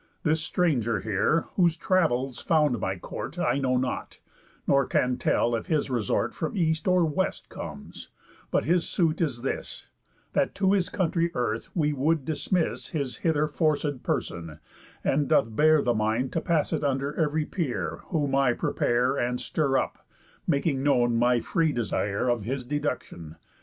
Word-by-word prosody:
This 160 Hz, 0 st, +2 dB
stranger 125 Hz, -, 0 dB
here, 110 Hz, -, +1 dB, 0.2 s
whose 170 Hz, -3 st, +3 dB
travels 135 Hz, -8 st, +1 dB
found 150 Hz, -7 st, +2 dB
my 95 Hz, +1 st, -2 dB
court, 135 Hz, -, -7 dB
I 160 Hz, -5 st, +1 dB
know 130 Hz, -2 st, +1 dB
not, 125 Hz, 0 st, -3 dB, 0.5 s
nor 140 Hz, -1 st, +3 dB
can 125 Hz, 0 st, +1 dB
tell 120 Hz, -, +2 dB
if 115 Hz, -, -2 dB
his 150 Hz, -4 st, 0 dB
resort 115 Hz, -5 st, 0 dB
From 160 Hz, +5 st, -4 dB
East 160 Hz, -2 st, +1 dB
or 180 Hz, -2 st, +4 dB
West 175 Hz, +5 st, -2 dB
comes; -, -, -8 dB, 0.4 s
but -, -, +1 dB
his 170 Hz, +1 st, +1 dB
suit 165 Hz, -2 st, +1 dB
is 130 Hz, -7 st, -1 dB
this: 135 Hz, -, -4 dB, 0.5 s
That -, -, +1 dB
to 195 Hz, -1 st, +2 dB
his 190 Hz, -3 st, +1 dB
country 170 Hz, -2 st, 0 dB
earth 115 Hz, -2 st, -2 dB
we 150 Hz, -4 st, +1 dB
would 145 Hz, +1 st, +1 dB
dismiss 160 Hz, +3 st, -1 dB
His 140 Hz, -7 st, -3 dB
hither 155 Hz, -2 st, +1 dB
forcéd 150 Hz, -3 st, 0 dB
person, 80 Hz, -3 st, -3 dB, 0.5 s
and 140 Hz, +1 st, +1 dB
doth 110 Hz, -1 st, +2 dB
bear 155 Hz, +1 st, +5 dB
The 120 Hz, -, +2 dB
mind 110 Hz, +4 st, 0 dB
to 165 Hz, -, 0 dB
pass 160 Hz, -3 st, +1 dB
it -, -, -1 dB
under 140 Hz, +1 st, 0 dB
ev'ry 155 Hz, -1 st, 0 dB
peer; 155 Hz, -10 st, -3 dB
Whom 145 Hz, -5 st, -1 dB
I 135 Hz, -3 st, +3 dB
prepare, 125 Hz, +3 st, +1 dB
and 125 Hz, +1 st, -1 dB
stir 140 Hz, -4 st, 0 dB
up, -, -, -3 dB, 0.4 s
making 140 Hz, -3 st, +1 dB
known 120 Hz, -4 st, +3 dB
My 120 Hz, 0 st, +3 dB
free 160 Hz, +4 st, +1 dB
desire 110 Hz, -2 st, -1 dB
of 120 Hz, -2 st, +1 dB
his 130 Hz, +4 st, -3 dB
deductión. 125 Hz, -, -4 dB
140 Hz, 165 wpm, -27 LUFS, 120-160 Hz, 0.5 s, bear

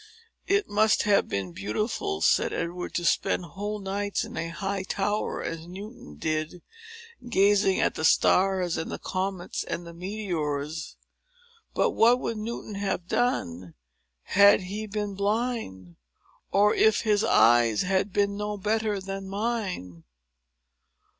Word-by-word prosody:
"It 405 Hz, +1 st, +2 dB
must 215 Hz, +1 st, +3 dB
have 205 Hz, -1 st, +3 dB
been 95 Hz, -2 st, -3 dB
beautiful," 105 Hz, -, -2 dB
said -, -, +3 dB
Edward, 175 Hz, +2 st, -4 dB
"to 175 Hz, -, -1 dB
spend 175 Hz, -, +1 dB
whole 205 Hz, +6 st, -5 dB
nights 200 Hz, +2 st, -2 dB
in 230 Hz, +1 st, -8 dB
a 165 Hz, -, -2 dB
high 195 Hz, +3 st, -3 dB
tower, 205 Hz, +2 st, -2 dB
as 165 Hz, 0 st, -5 dB
Newton 185 Hz, -, -10 dB
did, 155 Hz, -, -3 dB, 0.7 s
gazing 200 Hz, -2 st, +3 dB
at -, -, +2 dB
the -, -, -5 dB
stars, 185 Hz, +2 st, +3 dB
and 160 Hz, -, -4 dB
the -, -, -4 dB
comets, 185 Hz, -1 st, -3 dB
and 175 Hz, -, -5 dB
the 170 Hz, -, -9 dB
meteors. 165 Hz, -5 st, -4 dB, 0.8 s
But 475 Hz, -, +2 dB
what 240 Hz, -, +4 dB
would 230 Hz, -, -3 dB
Newton 215 Hz, 0 st, -5 dB
have 195 Hz, -3 st, -2 dB
done, 90 Hz, -, -1 dB, 0.5 s
had 200 Hz, +1 st, +5 dB
he 205 Hz, +4 st, -5 dB
been 205 Hz, -1 st, -3 dB
blind? 200 Hz, -, -2 dB, 0.5 s
or 205 Hz, +2 st, +4 dB
if 220 Hz, -1 st, +3 dB
his 210 Hz, -2 st, +2 dB
eyes 115 Hz, -2 st, +4 dB
had 190 Hz, +2 st, 0 dB
been 200 Hz, +1 st, +1 dB
no 210 Hz, 0 st, -3 dB
better 215 Hz, +1 st, 0 dB
than 195 Hz, 0 st, -6 dB
mine?" 195 Hz, -, -3 dB
195 Hz, 135 wpm, -27 LUFS, 170-210 Hz, 0.8 s, had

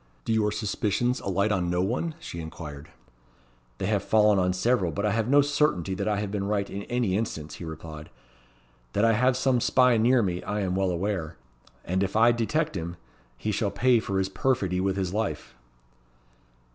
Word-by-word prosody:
"Do -, -, 0 dB
your 105 Hz, -1 st, +2 dB
suspicions 110 Hz, +4 st, -1 dB
alight 100 Hz, +2 st, 0 dB
on 90 Hz, -4 st, 0 dB
no 90 Hz, +1 st, +1 dB
one?" 130 Hz, -, -2 dB
she 125 Hz, -, -7 dB
inquired. 80 Hz, -2 st, -8 dB, 0.9 s
"They -, -, -3 dB
have 100 Hz, 0 st, +1 dB
fallen 105 Hz, -2 st, +4 dB
on 90 Hz, 0 st, +2 dB
several; 95 Hz, -1 st, +1 dB
but 100 Hz, +6 st, -2 dB
I 105 Hz, -, +2 dB
have 110 Hz, +1 st, 0 dB
no 140 Hz, +2 st, +5 dB
certainty 145 Hz, -, +1 dB
that 100 Hz, +2 st, -3 dB
I 105 Hz, -1 st, +1 dB
have 105 Hz, -1 st, -3 dB
been 100 Hz, -1 st, -2 dB
right 100 Hz, -1 st, 0 dB
in 100 Hz, -, -6 dB
any 120 Hz, -6 st, 0 dB
instance," 80 Hz, -8 st, -3 dB
he 85 Hz, -, -7 dB
replied. 80 Hz, -1 st, -8 dB, 0.8 s
"That 105 Hz, -, +2 dB
I 115 Hz, -, +4 dB
have 125 Hz, +3 st, +2 dB
some 130 Hz, -2 st, +2 dB
spy 125 Hz, -1 st, +4 dB
near 120 Hz, +2 st, +4 dB
me, 90 Hz, -2 st, -2 dB
I 105 Hz, +1 st, -3 dB
am 95 Hz, -2 st, -1 dB
well 95 Hz, -1 st, +1 dB
aware; 85 Hz, -3 st, -2 dB, 0.5 s
and 95 Hz, +2 st, 0 dB
if 100 Hz, +1 st, -1 dB
I 115 Hz, +2 st, +6 dB
detect 120 Hz, +5 st, -1 dB
him, 85 Hz, -1 st, -4 dB, 0.4 s
he 105 Hz, -, -2 dB
shall 105 Hz, 0 st, 0 dB
pay 120 Hz, +4 st, +3 dB
for 100 Hz, -3 st, -3 dB
his 95 Hz, 0 st, +1 dB
perfidy 95 Hz, -5 st, 0 dB
with 95 Hz, 0 st, 0 dB
his 95 Hz, -2 st, -2 dB
life." 110 Hz, -1 st, -3 dB
100 Hz, 195 wpm, -26 LUFS, 90-115 Hz, 0.9 s, I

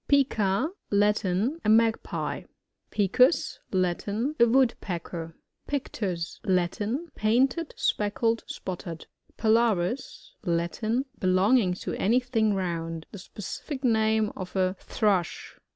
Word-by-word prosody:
Pica. 255 Hz, -, +2 dB
— -, -, -52 dB
Latin. 210 Hz, -, +1 dB
A -, -, +1 dB
Magpie. 225 Hz, +1 st, +1 dB, 0.4 s
Picus. 220 Hz, -, +3 dB
— -, -, -42 dB
Latin. 205 Hz, -, -1 dB
A 235 Hz, -, +7 dB
Woodpecker. 175 Hz, -9 st, 0 dB, 0.3 s
PfCTUi. 195 Hz, -11 st, -3 dB
— -, -, -42 dB
Latin. 215 Hz, -, -2 dB
Painted, 260 Hz, +9 st, +1 dB
speckled, 225 Hz, +2 st, 0 dB
spotted. 170 Hz, -3 st, -6 dB, 0.3 s
Pilaris. 225 Hz, 0 st, +1 dB
— -, -, -45 dB
Latin. 215 Hz, +9 st, -1 dB
Belonging 185 Hz, +2 st, +3 dB
to -, -, -5 dB
any 230 Hz, +6 st, +4 dB
thing 225 Hz, -5 st, +1 dB
round. 165 Hz, -3 st, -3 dB
The 205 Hz, -, -8 dB
specific 260 Hz, -, -7 dB
nam» 220 Hz, -2 st, +2 dB
of 185 Hz, 0 st, -7 dB
a 185 Hz, 0 st, +1 dB
Thrush. 195 Hz, -6 st, -1 dB
215 Hz, 115 wpm, -27 LUFS, 185-240 Hz, 0.4 s, A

